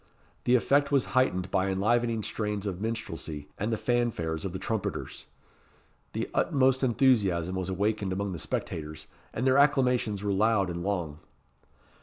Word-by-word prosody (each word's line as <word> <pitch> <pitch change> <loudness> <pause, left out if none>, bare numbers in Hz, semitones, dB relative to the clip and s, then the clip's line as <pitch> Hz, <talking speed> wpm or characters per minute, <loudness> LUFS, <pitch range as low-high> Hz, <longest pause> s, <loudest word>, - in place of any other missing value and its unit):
The 125 - +5
effect 140 +4 +3
was 140 -3 +3
heightened 95 -8 +1
by 95 +1 +1
enlivening 115 +3 +1
strains 105 -1 -2
of 95 -2 -3
minstrelsy, 80 -10 -4
and 105 +3 -1
the 110 - 0
fanfares 110 -11 -1
of 95 - -2
the 95 - -4
trumpeters. 110 +2 -4 0.9
The - - -2
utmost 130 -1 +2
enthusiasm 105 -9 +2
was 95 0 -3
awakened 100 +1 0
among 100 +1 -2
the 85 - -5
spectators, 75 +1 -4 0.3
and 125 - -2
their 130 +1 +5
acclamations 125 -8 +2
were 100 -1 0
loud 100 -2 +2
and 85 0 -4
long. 85 -6 -2
105 Hz, 150 wpm, -28 LUFS, 95-120 Hz, 0.9 s, The